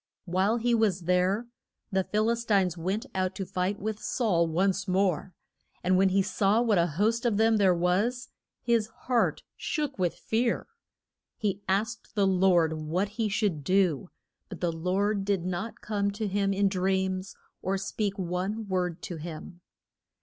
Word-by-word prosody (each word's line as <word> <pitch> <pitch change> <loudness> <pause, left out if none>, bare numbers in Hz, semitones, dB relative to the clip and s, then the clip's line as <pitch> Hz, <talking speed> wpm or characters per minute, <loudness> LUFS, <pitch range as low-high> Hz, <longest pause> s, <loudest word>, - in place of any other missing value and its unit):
] - - -59
While 190 +5 +1
he 240 +1 +1
was 215 -5 +2
there, 180 +5 +1 0.5
the 190 -1 +2
Phil 215 +4 +1
is 235 0 -2
tines 195 -6 +2
went 190 +8 -2
out 185 -1 -1
to 195 - -4
fight 185 +3 -1
with 215 +1 -3
Saul 190 -11 +1
once 190 +4 0
more, 185 -1 0 0.5
and 185 +1 +3
when 190 +1 +4
he 195 +1 +3
saw 200 +3 +2
what 225 -6 +3
a 170 - +3
host 225 +4 +2
of 230 -4 +1
them 220 0 +4
there 190 -3 +4
was, 200 +9 0 0.3
his 230 -3 +2 0.2
heart 245 -2 +1
shook 295 - -3
with 175 -2 +1
fear. 235 +2 0 0.7
He 200 -2 -1
asked 215 +3 -1
the 200 -2 +3
Lord 180 -4 +3
what 160 +6 -1
he 215 +1 -2
should 195 -8 0
do, 180 -1 +2 0.4
but - - -8
the 175 -2 0
Lord 195 +5 0
did 195 -3 0
not 185 +5 -4
come 200 -2 -1
to 215 +1 -2
him 200 0 +1
in 200 +1 +2
dreams, 190 0 -1 0.3
or 195 +1 0
speak 200 +1 -2
one 190 +4 -2
word 180 -3 -2
to 175 - -5
him. 170 +2 -8
195 Hz, 170 wpm, -28 LUFS, 180-215 Hz, 0.7 s, when